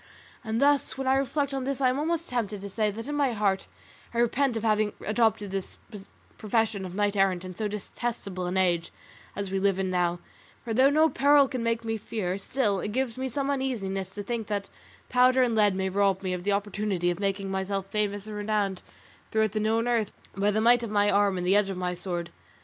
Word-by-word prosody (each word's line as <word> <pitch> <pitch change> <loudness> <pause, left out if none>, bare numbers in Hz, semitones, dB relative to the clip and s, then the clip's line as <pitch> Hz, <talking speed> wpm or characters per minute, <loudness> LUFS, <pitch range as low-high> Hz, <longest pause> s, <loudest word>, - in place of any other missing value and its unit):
And 225 -1 -2
thus 285 -1 +2
when 270 - -3
I 260 - +3
reflect 275 +1 0
on 270 -1 -2
this, 275 0 -2
I 260 -2 +4
am 255 +2 -1
almost 335 +2 -1
tempted 215 -5 -2
to 200 - -6
say 215 +1 +1
that 225 +4 -6
in 295 - -3
my 280 -4 +1
heart 200 -3 0 0.5
I - - -2
repent 240 +1 +2
of 225 - -4
having 215 -1 +2
adopted 215 -2 +1
this 195 -1 -4 0.6
profession 215 -2 0
of 180 - -9
knight 205 0 +1
errant 190 -2 +2
in 185 - -7
so 215 +4 -2
detestable 205 -2 -4
an 180 +1 -1
age 175 -3 +1 0.4
as 200 -1 -4
we 195 - 0
live 195 -1 +2
in 190 -1 -1
now; 175 -1 +1 0.5
for 230 - -3
though 260 +4 +5
no 310 +2 +4
peril 285 -2 +4
can 255 -2 -4
make 230 0 -1
me 225 0 -1
fear, 200 -3 -3
still 205 -2 0
it 210 - -4
gives 260 -2 -1
me 260 0 -3
some 275 +2 -1
uneasiness 200 -9 -2
to 205 - -4
think 230 0 -3
that 200 -2 -3 0.4
powder 255 +1 +4
and 240 -2 +1
lead 210 -3 +3
may 190 0 -1
rob 195 0 +1
me 185 -1 -1
of 180 -1 -4
the 205 - +1
opportunity 200 -3 0
of 175 - -5
making 195 -1 -1
myself 190 0 -2
famous 205 0 -1
and 215 -1 -7
renowned 205 -2 -1 0.5
throughout 220 -1 +1
the 215 - -1
known 225 +2 +1
earth 230 -4 +1 0.2
by 200 +1 +2
the 215 +1 +1
might 240 +1 +5
of 230 - -4
my 205 0 +3
arm 200 -2 +3
and 180 - -2
the 190 +2 +4
edge 205 -1 +3
of 190 - -4
my 180 -1 -1
sword. 175 -1 -4
210 Hz, 225 wpm, -27 LUFS, 195-240 Hz, 0.6 s, though